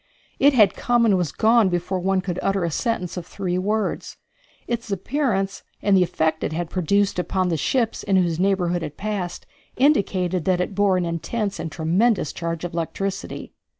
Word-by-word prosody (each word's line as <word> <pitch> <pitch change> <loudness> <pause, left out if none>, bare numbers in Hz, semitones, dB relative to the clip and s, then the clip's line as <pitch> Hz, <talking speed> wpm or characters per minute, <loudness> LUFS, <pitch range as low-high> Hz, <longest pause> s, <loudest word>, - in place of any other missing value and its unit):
It 285 +1 +5
had 210 -5 +5
come 240 -1 +2
and 210 -4 +4
was 175 -6 0
gone 225 -2 +4
before 175 +1 -1
one 190 +1 +1
could 180 -1 -3
utter 195 -2 0
a 170 - -1
sentence 185 - -2
of 175 - -5
three 185 -2 -2
words. 210 +3 -2 0.5
Its 235 -2 -4
appearance, 195 -1 -1 0.2
and 200 -1 +3
the 185 - +5
effect 160 -2 0
it - - -1
had 170 0 -3
produced 195 +2 +1
upon 185 0 0
the 165 - +1
ships 230 - 0
in 195 - 0
whose 175 -3 +2
neighborhood 180 -2 +1
it 150 -2 -6
passed, 195 -4 -4 0.3
indicated 190 - +2
that 185 -2 +2
it 180 - -2
bore 200 -1 +3
an 180 - 0
intense 195 +5 -3
and 165 - -4
tremendous 175 +3 +1
charge 170 -1 -4
of 175 - -4
electricity. 190 +4 -4
185 Hz, 185 wpm, -23 LUFS, 175-205 Hz, 0.5 s, It